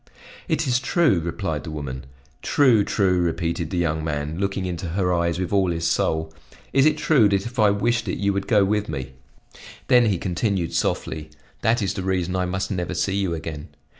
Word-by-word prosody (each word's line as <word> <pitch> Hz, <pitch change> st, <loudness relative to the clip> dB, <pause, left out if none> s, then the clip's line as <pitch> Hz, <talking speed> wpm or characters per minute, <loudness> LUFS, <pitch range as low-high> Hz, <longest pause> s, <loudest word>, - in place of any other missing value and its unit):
"It -, -, 0 dB
is 125 Hz, -1 st, +2 dB
true," 135 Hz, -, +2 dB
replied 85 Hz, 0 st, -3 dB
the -, -, -7 dB
woman. 65 Hz, -4 st, -6 dB, 0.3 s
"True! 125 Hz, -7 st, +4 dB
true!" 95 Hz, -3 st, +1 dB
repeated 85 Hz, -1 st, -1 dB
the 90 Hz, -, -3 dB
young 80 Hz, -2 st, 0 dB
man, 75 Hz, +1 st, -3 dB
looking 100 Hz, -1 st, -1 dB
into 90 Hz, -1 st, -4 dB
her 90 Hz, +1 st, 0 dB
eyes 85 Hz, -1 st, 0 dB
with 90 Hz, +1 st, -3 dB
all 95 Hz, -2 st, +3 dB
his 85 Hz, -1 st, -1 dB
soul. 80 Hz, -1 st, 0 dB, 0.4 s
"Is 135 Hz, +2 st, +5 dB
it 155 Hz, -1 st, +2 dB
true 135 Hz, -9 st, +4 dB
that 100 Hz, -1 st, 0 dB
if 120 Hz, +1 st, -6 dB
I 105 Hz, -1 st, +6 dB
wished 110 Hz, +3 st, 0 dB
it 90 Hz, -, -2 dB
you 100 Hz, 0 st, +1 dB
would 100 Hz, 0 st, -3 dB
go 105 Hz, -4 st, +4 dB
with 105 Hz, +1 st, 0 dB
me?" 65 Hz, -3 st, -5 dB, 0.8 s
Then 125 Hz, -2 st, +6 dB
he 100 Hz, -4 st, +1 dB
continued 90 Hz, 0 st, -1 dB
softly: 80 Hz, -1 st, -2 dB, 0.3 s
"That 115 Hz, 0 st, +2 dB
is 95 Hz, -1 st, -1 dB
the 100 Hz, -, -4 dB
reason 90 Hz, -1 st, -1 dB
I 90 Hz, 0 st, 0 dB
must 95 Hz, +3 st, -3 dB
never 90 Hz, -1 st, -2 dB
see 95 Hz, +2 st, 0 dB
you 95 Hz, -4 st, 0 dB
again. 80 Hz, -2 st, -6 dB
95 Hz, 200 wpm, -23 LUFS, 85-105 Hz, 0.8 s, I